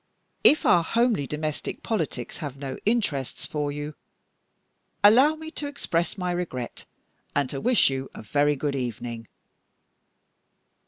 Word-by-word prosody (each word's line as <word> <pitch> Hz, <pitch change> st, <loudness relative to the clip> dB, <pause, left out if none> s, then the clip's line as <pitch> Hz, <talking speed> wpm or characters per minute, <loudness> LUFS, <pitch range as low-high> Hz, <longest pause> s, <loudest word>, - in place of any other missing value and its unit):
If 305 Hz, -, +6 dB
our 175 Hz, -1 st, +5 dB
homely 230 Hz, -, +1 dB
domestic 150 Hz, +1 st, -4 dB
politics 160 Hz, -, -2 dB
have 145 Hz, -4 st, -6 dB
no 135 Hz, -1 st, -5 dB
interests 185 Hz, -, 0 dB
for 150 Hz, -1 st, -2 dB
you, 145 Hz, +1 st, -5 dB, 1.1 s
allow 260 Hz, +9 st, +7 dB
me 315 Hz, 0 st, -8 dB
to 295 Hz, -, -4 dB
express 175 Hz, -, -1 dB
my 180 Hz, -1 st, -1 dB
regret, 165 Hz, -9 st, -4 dB, 0.5 s
and 145 Hz, -2 st, +2 dB
to 135 Hz, -, -4 dB
wish 245 Hz, -, +4 dB
you 135 Hz, 0 st, -3 dB
a -, -, -8 dB
very 145 Hz, +6 st, +2 dB
good 140 Hz, 0 st, -2 dB
evening." 120 Hz, -2 st, -4 dB
150 Hz, 130 wpm, -26 LUFS, 135-210 Hz, 1.1 s, allow